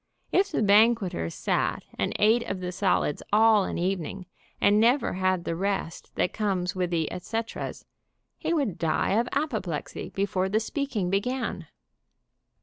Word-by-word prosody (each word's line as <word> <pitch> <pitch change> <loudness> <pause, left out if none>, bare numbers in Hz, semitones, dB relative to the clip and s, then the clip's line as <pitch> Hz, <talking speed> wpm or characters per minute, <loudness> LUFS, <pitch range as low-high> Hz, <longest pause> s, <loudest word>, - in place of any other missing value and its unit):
If 395 +1 +3
the - - +1
banqueter 205 - +3
sat - - -1
and - - -1
ate 220 +3 +4
of 195 - -3
the 180 0 -4
solids 185 -5 0
all 215 -1 +5
an - - -3
evening, 185 +1 -2 0.3
and 205 +1 +4
never 240 +3 +3
had 185 -1 0
the 165 - -2
rest 190 -2 -3
that 180 - 0
comes 195 -3 -1
with 180 -1 0
the 165 -3 -1
et 180 - -5
ceteras, 225 +4 -4 0.5
he - - -2
would 275 - 0
die 160 -2 +1
of 240 +1 -1
apoplexy 205 - -3
before 190 -1 -1
the 215 +3 +2
speaking 225 -6 -2
began. 200 -4 -2
195 Hz, 150 wpm, -27 LUFS, 180-225 Hz, 0.5 s, all